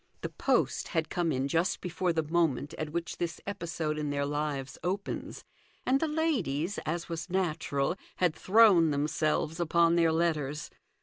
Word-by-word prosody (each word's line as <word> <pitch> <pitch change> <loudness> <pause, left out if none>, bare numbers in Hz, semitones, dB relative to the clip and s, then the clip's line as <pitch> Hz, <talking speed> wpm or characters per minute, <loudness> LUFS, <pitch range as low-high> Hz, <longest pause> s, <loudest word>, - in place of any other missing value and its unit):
The - - -3
post - - 0
had 160 -3 -1
come 175 -2 0
in 135 0 0
just 165 +5 +1
before 180 0 -1
the 160 -1 0
moment 155 -3 0
at 155 - -2
which 170 +2 -4
this 170 -1 -3
episode 165 -5 -3
in 150 -1 -2
their 140 0 0
lives 145 -2 -3
opens, 195 +3 -3 0.4
and 265 +1 +3
the 320 - +1
ladies, 205 - 0
as 170 +2 -2
was 165 +1 -5
natural, 165 -5 0 0.2
had 180 -3 +2
thrown 195 -5 +5
themselves 150 +2 0
upon 170 0 +3
their 165 -1 +4
letters. 155 -3 -1
165 Hz, 160 wpm, -30 LUFS, 150-175 Hz, 0.4 s, thrown